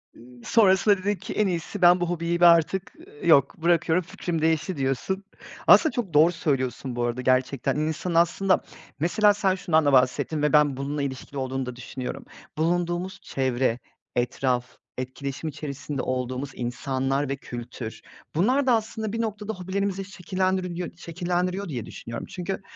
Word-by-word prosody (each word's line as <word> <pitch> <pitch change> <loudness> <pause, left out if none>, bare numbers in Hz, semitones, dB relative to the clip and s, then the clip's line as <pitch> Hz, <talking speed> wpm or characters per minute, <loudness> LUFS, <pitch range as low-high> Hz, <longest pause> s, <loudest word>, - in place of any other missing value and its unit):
Iıı, 120 0 -16
sonrasında 200 -2 +4
dedin 200 +2 -1
ki: - - -7
"En 210 -2 +2
iyisi 180 +3 -3
ben 175 +1 +7
bu 175 - 0
hobiyi 170 0 -1
bir 175 - +6
artık, 170 +3 +4 0.3
yok, 140 -1 +4
bırakıyorum, 170 +1 +2
fikrim 165 -2 -4
değişti." 160 +1 +1
diyorsun. 135 +9 -1 0.4
Aslında 315 - +7
çok 215 - -3
doğru 160 +4 +6
söylüyorsun, 130 -5 -2
bu 120 - -1
arada, 120 +1 -1
gerçekten. 130 +1 +1
İnsanın, 155 +3 -2
aslında 180 +3 +3 0.4
mesela 205 +6 +4
sen 195 -2 +1
şundan 160 -4 +2
da 140 - +3
bahsettin 130 +4 +2
ve 150 -1 +1
ben 145 -3 +4
bununla 140 +1 -3
ilişkili 140 0 -5
olduğunu 130 0 -2
da 125 -1 -6
düşünüyorum, 130 0 -6 0.3
bulunduğumuz 175 +3 -1
çevre, 130 -2 0 0.4
etraf, 125 0 -1 0.2
etkileşim 140 +4 -4
içerisinde 145 -1 -5
olduğumuz 130 +2 -3
insanlar 135 +3 -1
ve 135 - 0
kültür. 120 -3 -7 0.3
Bunlar 255 - +2
da 250 - +5
aslında 220 -1 -2
bir 230 - -1
noktada 215 -1 -3
hobilerimizi 195 +1 -2
şekillendirebiliy 185 -1 -2
şekillendiriyor 180 +2 -2
diye 120 -6 -4
düşünüyorum. 115 0 -7
Çünkü 190 +1 -4
160 Hz, 150 wpm, -25 LUFS, 130-185 Hz, 0.4 s, ben